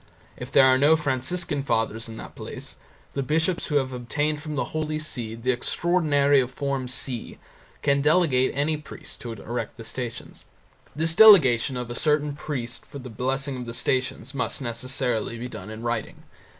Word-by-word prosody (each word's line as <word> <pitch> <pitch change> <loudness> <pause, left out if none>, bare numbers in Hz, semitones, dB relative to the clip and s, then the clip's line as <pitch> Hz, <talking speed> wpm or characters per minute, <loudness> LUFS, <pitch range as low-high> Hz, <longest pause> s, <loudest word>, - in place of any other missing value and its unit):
If 125 +2 -8
there 135 - +7
are 130 0 +5
no 150 +3 +6
Franciscan 145 +1 -1
Fathers 115 -3 -1
in 110 - -8
that - - -9
place - - -8 0.4
the 140 - -1
bishops 160 +6 0
who 150 - -2
have 130 -2 +1
obtained 145 +5 -1
from 150 0 -5
the 145 - 0
Holy 155 -1 -1
See 120 -7 -3
the 120 +3 0
extraordinary 145 +1 +2
of 125 - -3
Form 135 -1 -2
C 125 -1 -4 0.5
can 140 -1 +3
delegate 150 -4 +3
any 150 +2 +1
priest 150 - -10
to 120 - -5
erect 115 +3 -5
the 115 - -8
Stations. 120 +1 -6 0.5
This 160 +2 +1
delegation 140 - +7
of 125 -1 -4
a - - -3
certain 150 +2 +1
priest 125 -5 -5
for - - -10
the 130 -3 -8
blessing 135 +4 -1
of 125 -1 -6
the 115 - -4
Stations 130 +1 -1
must 135 - -1
necessarily 120 -2 -2
be 120 +2 -5
done 120 - -8
in 110 +1 -8
writing. 120 -2 -3
130 Hz, 175 wpm, -25 LUFS, 120-150 Hz, 0.5 s, there